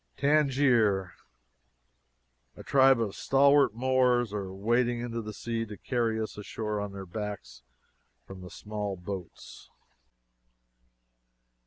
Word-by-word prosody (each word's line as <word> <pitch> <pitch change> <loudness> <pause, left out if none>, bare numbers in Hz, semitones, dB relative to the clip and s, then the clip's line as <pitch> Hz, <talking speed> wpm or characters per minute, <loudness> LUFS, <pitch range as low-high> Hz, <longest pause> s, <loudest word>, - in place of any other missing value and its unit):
Tangier! 130 -10 +2 1.4
A - - -10
tribe 135 -2 +5
of 110 -4 -2
stalwart 140 -3 +4
Moors 125 -2 +2
are 100 -3 -4
wading 120 +5 0
into 115 -1 -4
the 110 -1 -7
sea 115 +2 -3
to 105 -1 -9
carry 115 -3 -1
us 110 -1 -5
ashore 105 0 -4
on 105 -1 -5
their 100 -1 -8
backs 105 - -7 0.6
from 95 -1 -11
the 90 - -9
small 105 -1 -5
boats. 90 0 -9
110 Hz, 115 wpm, -28 LUFS, 100-125 Hz, 1.4 s, tribe